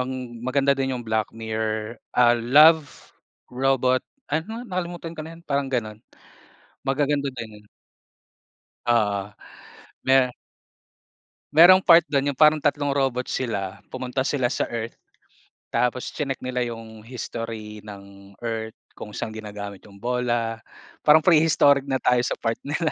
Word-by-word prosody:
ang 125 -2 -5
maganda 135 +3 +2
din 135 -1 -1
yung 120 - -7
Black 110 -1 0
Mirror, 110 0 -3 0.2
ah 120 -1 +6
Love 145 +6 +4 0.4
Robot 130 0 +2 0.3
ano 220 +10 -3
nakalimutan 175 -5 -5
ka 160 - -8
na 160 +2 -8
yun 170 - -17
parang 140 -3 -1
ganun 110 -4 -3 0.8
magaganda 140 0 0
din 110 -4 -9
yun. - - -25 1.2
Oo, 105 -4 +1 0.7
me 130 -1 +4 1.2
merong 175 +5 +8
part 170 -3 +6
dun 145 -2 0
yung 140 - -2
parang 155 +1 +5
3 145 -1 0
robot 135 -3 0
sila 100 -6 -3
pumunta 130 +1 -4
sila 130 -2 0
sa - - -1
Earth 115 -1 -5 0.7
tapos 125 +1 0
chineck 135 -3 -3
nila 125 0 -2
yung 115 -2 -9
history 110 -2 -7
ng 100 -1 -13
Earth 110 -1 -4 0.2
kung 105 -1 -10
saan 110 - -4
ginagamit 105 -2 -7
yung 100 - -16
bola, 120 0 -1 0.4
parang 155 +1 +5
pre-historic 150 -5 +4
na 135 - 0
tayo 125 -1 +2
sa - - -2
part 115 -1 -2
nila. 155 +3 -1
125 Hz, 135 wpm, -24 LUFS, 110-145 Hz, 1.2 s, merong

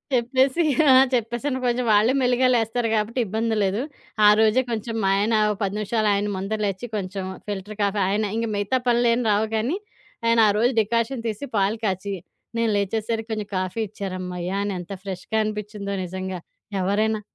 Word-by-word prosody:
చెప్పేసి 260 +6 +2 0.3
ఆ! - - +8 0.2
చెప్పేసాను. 240 +3 -1
కొంచెం 240 0 0
వాళ్ళే 215 +5 +4
మెల్లిగా 250 +1 +3
లేస్తారు 230 +1 0
గాబట్టి, 220 +4 -1
ఇబ్బంది 220 +2 -1
లేదు. 200 +5 0 0.4
ఆ - - +9
రోజే 220 +4 +4
కొంచెం 225 0 -3
మా 195 - +3
ఆయన 220 +2 +2 0.3
10 195 +1 -1
నిమిషాలు 215 0 0
ఆయన 205 +1 -1
ముంద 195 +3 -3
లేచి, 200 +4 -3
కొంచెం 190 0 -4 0.2
ఫిల్టర్ 205 +1 -5
కాఫీ 200 0 +1
ఆయన 210 +2 +1
ఇంక 230 0 -1
మిగతా 205 +6 0
పనులేమి 240 0 +3
రావు 210 +2 +2
గానీ, 245 - 0 0.5
ఆయన 230 0 +4
ఆ - - +4
రోజు 240 +3 +3
డికాషన్ 230 +3 -1
తీసి, 215 +7 -5
పాలు 205 +3 +1
కాచి, 195 +1 -2 0.4
నేను 230 -1 +2
లేచేసరికి 220 +3 -2
కొంచెం 210 -2 -4
కాఫీ 185 +4 -3
ఇచ్చారమ్మయ్యా! 185 -2 -4
అనెంత 190 -1 -4
ఫ్రెష్‌గా 190 +3 -3
అనిపిచ్చిందో 210 -1 -4
నిజంగా. 185 0 -5 0.4
ఎవరైనా 215 +3 +1
215 Hz, 160 wpm, -23 LUFS, 200-230 Hz, 0.5 s, ఆ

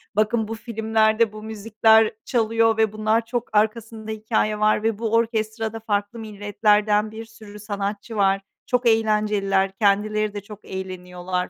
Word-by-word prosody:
Bakın, 215 +1 +1
bu 225 - -4
filmlerde 220 -1 +1
bu 215 - -9
müzikler 220 0 +3
çalıyor 225 -1 +2
ve 220 -2 +2
bunlar 215 +2 +1
çok 240 -1 -4
arkasında 220 0 -1
hikâye 215 -1 -1
var 215 0 +2
ve 225 -2 0
bu 225 -1 -2
orkestrada 225 -1 -1
farklı 210 +1 -2
milletlerden 210 0 +1
bir 225 +1 -8
sürü 215 -2 -13
sanatçı 205 +2 -4
var. 195 -1 +2 0.2
Çok 250 -1 0
eğlenceliler, 210 -3 +2
kendileri 215 0 +1
de 205 - -5
çok 205 +1 -13
eğleniyorlar 180 -1 -5
215 Hz, 140 wpm, -23 LUFS, 205-225 Hz, 0.2 s, müzikler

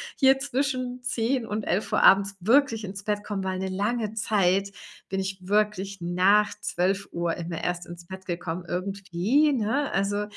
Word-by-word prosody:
hier 270 0 +5
zwischen 255 -2 -2
10:00 245 0 0
und 215 0 -3
11:00 195 +4 0
abends 195 0 +5
wirklich 230 +2 +3
ins 195 0 -7
Bett 205 0 -1
komme, 200 -2 -3
weil 185 -1 -2
'ne 190 0 -2
lange 210 +3 -1
Zeit 200 -2 +1 0.4
bin 190 - -2
ich 190 0 -3
wirklich 205 -1 0
nach 185 +5 +3
12:00 180 -3 -1
immer 170 -1 -5
erst 175 0 -2
ins 170 0 -11
Bett 190 +1 -9
gekommen 175 -1 -4
irgendwie, 195 - +1
ne? 265 +4 0
Also, 205 +1 0
200 Hz, 155 wpm, -26 LUFS, 185-225 Hz, 0.4 s, hier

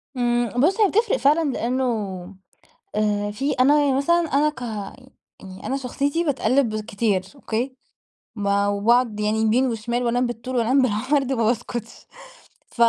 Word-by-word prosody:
إمم، 240 -1 +1
بص، 350 - +2
هي 420 - +6
بتفرق 445 +3 +1
فعلًا 300 +2 +2
لأنه 255 +2 -1 1.1
آآ 205 -1 0
في 270 +8 -2
أنا 280 +4 +4
يعني 280 -2 +2
مثلًا 280 +5 +3 0.2
أنا 295 +2 +4
ك 295 - -12 0.8
يعني 190 0 -10
أنا 265 - -1
شخصيتي 280 +5 -1
باتقلب 260 -6 +1
كتير 205 -3 0
أوكي، 255 -1 -4 0.6
ما 200 -1 +1
وباقعد 215 +2 +2
يعني 210 +1 0
يمين 230 +4 +2
وشمال 235 +1 -2
وأنام 245 +1 +1
بالطول 240 +2 -6
وأنام 250 +3 +3
بالعرض 260 +4 0
ما 230 -3 0
باسكتش 235 0 -3 0.6
ف 235 - -7
245 Hz, 145 wpm, -22 LUFS, 220-275 Hz, 1.1 s, هي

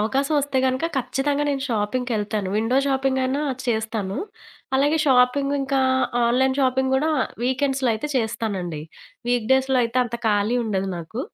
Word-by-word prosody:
అవకాశవొస్తే 275 +4 0
గనుక 260 +4 0
ఖచ్చితంగా 280 +3 0
నేను 275 -1 -2
షాపింగ్‌కెళ్తాను. 215 -2 -1
విండో 225 +4 +1
షాపింగయినా 265 +1 0 0.2
చేస్తాను. 220 -2 -2 0.6
అలాగే 290 +4 +2
షాపింగింకా 275 +1 +2 0.5
ఆన్‌లైన్ 260 +3 +2
షాపింగ్ 265 0 +1
కూడా 310 +4 +1 0.3
వీకెండ్స్‌లో 265 0 +1
అయితే 260 +8 -4
చేస్తానండి. 200 -9 -2 0.5
వీక్‌డేస్‌లో 260 +2 +2
అయితే 230 +2 -1
అంత 235 0 -4
ఖాళీ 210 +3 +1
ఉండదు 195 -3 -1
నాకు. 170 +9 -6
255 Hz, 115 wpm, -23 LUFS, 220-270 Hz, 0.6 s, అలాగే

